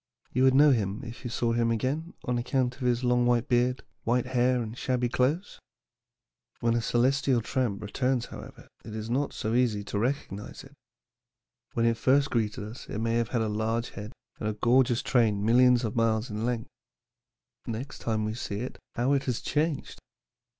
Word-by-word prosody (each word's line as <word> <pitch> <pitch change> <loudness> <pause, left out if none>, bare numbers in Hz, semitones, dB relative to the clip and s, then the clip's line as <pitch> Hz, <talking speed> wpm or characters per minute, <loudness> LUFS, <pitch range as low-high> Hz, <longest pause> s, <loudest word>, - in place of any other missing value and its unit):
You 130 +1 +3
would 130 0 +5
know 145 +1 +7
him 105 -5 0
if 115 +1 -9
you 120 - -4
saw 115 0 0
him 115 0 +2
again 135 +9 -2
on 125 -1 0
account 125 0 0
of - - -16
his 125 0 +1
long 125 0 +3
white 120 -1 +2
beard, 125 +1 +1 0.2
white 120 +1 +1
hair, 125 0 +2
and 110 +1 -7
shabby 125 0 0
clothes. 140 +10 0 1.0
"When 115 0 +2
a 120 - +1
celestial 130 +2 +2
tramp 115 -3 -2
returns, 125 +4 0
however, - - -11 0.2
it 110 - -8
is 110 +1 -5
not 140 +3 0
so 110 - -3
easy 115 -4 +2
to 100 - -3
recognize 115 -4 -3
it. 135 +1 -15 1.0
When 115 -1 +1
it 115 -1 +2
first 135 +2 +3
greeted 110 -3 -1
us 110 +4 -9
it - - -4
may 115 +1 0
have 115 -1 +1
had 115 -3 0
a - - -1
large 110 +2 -1
head 105 +2 -7 0.3
and 105 - -1
a - - -1
gorgeous 120 +2 +3
train 105 -5 +2
millions 125 +2 +5
of 110 - -2
miles 115 0 +1
in 105 +3 -2
length. 120 -2 -3 1.0
Next 120 +5 -5
time 110 -2 -1
we 110 - -2
see 105 -3 -4
it, 125 - -6 0.2
how 125 +4 +2
it 140 -1 +1
has 125 -3 -1
changed! 150 -1 -2
120 Hz, 190 wpm, -28 LUFS, 110-130 Hz, 1.0 s, know